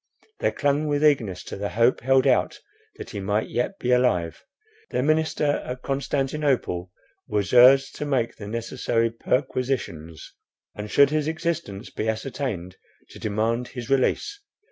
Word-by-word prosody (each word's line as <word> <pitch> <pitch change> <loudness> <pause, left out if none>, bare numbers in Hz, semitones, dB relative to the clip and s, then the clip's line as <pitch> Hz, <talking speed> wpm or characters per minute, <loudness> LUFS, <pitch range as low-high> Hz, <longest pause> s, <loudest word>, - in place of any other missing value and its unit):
They - - +2
clung 145 +1 0
with 145 0 +1
eagerness 115 -12 +2
to - - -7
the 100 +1 -3
hope 115 +3 +2
held 135 0 +3
out - - +2 0.4
that - - -9
he - - -5
might 105 +3 -1
yet 125 +11 -2
be 125 - -1
alive. 125 -10 +1 0.5
Their - - -1
minister 155 -1 +1
at 125 0 -6
Constantinople 135 -9 -1 0.4
was 105 0 -1
urged 135 +2 +6
to 150 - -3
make 125 -5 0
the 100 - -8
necessary 115 +1 -1
perquisitions, 120 - -3 0.4
and 105 0 -7
should 140 +4 +5
his 155 -1 0
existence 160 - -3
be 110 - -2
ascertained, 110 -6 -4 0.3
to - - -12
demand 115 +4 -1
his 125 +1 -7
release. 405 - +1
125 Hz, 145 wpm, -24 LUFS, 105-140 Hz, 0.5 s, urged